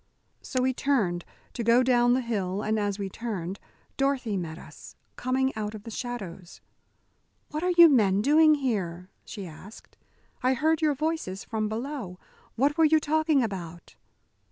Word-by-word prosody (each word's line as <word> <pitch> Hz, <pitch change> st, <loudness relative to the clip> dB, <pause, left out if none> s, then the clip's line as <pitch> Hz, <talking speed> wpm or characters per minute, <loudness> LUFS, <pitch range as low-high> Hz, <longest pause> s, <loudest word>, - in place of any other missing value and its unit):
So 255 Hz, -1 st, -2 dB
we 260 Hz, 0 st, +2 dB
turned 210 Hz, -12 st, 0 dB, 0.3 s
to 235 Hz, -, -3 dB
go 235 Hz, +3 st, +5 dB
down 245 Hz, -1 st, +4 dB
the 260 Hz, -, +1 dB
hill, 205 Hz, -4 st, -2 dB
and 220 Hz, 0 st, 0 dB
as 205 Hz, -1 st, -1 dB
we 200 Hz, -2 st, -3 dB
turned, 195 Hz, -3 st, -5 dB, 0.4 s
Dorothy 270 Hz, -6 st, 0 dB
met 165 Hz, -4 st, -4 dB
us, -, -, -13 dB, 0.2 s
coming 265 Hz, +1 st, 0 dB
out 215 Hz, 0 st, -4 dB
of 210 Hz, -, -10 dB
the 230 Hz, -, -8 dB
shadows. 195 Hz, -8 st, -7 dB, 0.9 s
"What 305 Hz, -, -3 dB
are 360 Hz, -, 0 dB
you 340 Hz, -1 st, +10 dB
men 205 Hz, -8 st, +3 dB
doing 310 Hz, +3 st, +6 dB
here?" 190 Hz, -, -3 dB
she 200 Hz, -4 st, -7 dB
asked. 185 Hz, +6 st, -13 dB, 0.4 s
"I 255 Hz, +1 st, +2 dB
heard 315 Hz, +5 st, +1 dB
your 300 Hz, -2 st, +2 dB
voices 305 Hz, -, -3 dB
from 215 Hz, -1 st, -2 dB
below. 225 Hz, -5 st, -5 dB, 0.4 s
What 285 Hz, +6 st, +1 dB
were 325 Hz, -, +6 dB
you 315 Hz, +1 st, +5 dB
talking 310 Hz, -2 st, +2 dB
about?" 175 Hz, -6 st, -6 dB
235 Hz, 160 wpm, -27 LUFS, 195-275 Hz, 0.9 s, you